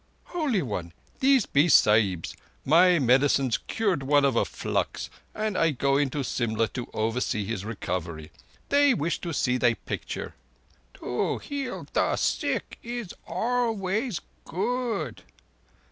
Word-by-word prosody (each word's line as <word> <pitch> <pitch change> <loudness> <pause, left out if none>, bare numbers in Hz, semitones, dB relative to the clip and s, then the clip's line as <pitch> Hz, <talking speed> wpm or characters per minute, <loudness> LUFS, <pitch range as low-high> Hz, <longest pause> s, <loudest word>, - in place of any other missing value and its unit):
"Holy 285 - +1
One, 90 -8 -4 0.3
these 265 -4 +4
be 145 +4 +3
Sahibs. 105 - +4 0.3
My 175 +5 +6
medicines 135 -1 +3
cured 200 -9 0
one 145 +1 +3
of 135 -3 +2
a - - +3
flux, - - -3 0.2
and 215 -2 -1
I 165 - +3
go 140 -1 +1
into 140 0 0
Simla 115 -3 0
to 125 -2 -6
oversee 110 -1 -1
his 105 -2 -3
recovery. 85 -7 -4 0.4
They 285 -2 +5
wish 165 +2 -1
to 170 - -4
see 125 -4 +1
thy 120 -2 +3
picture—" - - -5 0.6
"To 125 - -2
heal 280 -3 -5
the - - +2
sick - - -1
is 235 -5 -5
always 220 0 -1 0.2
good. 210 - -2
145 Hz, 130 wpm, -27 LUFS, -, 0.6 s, My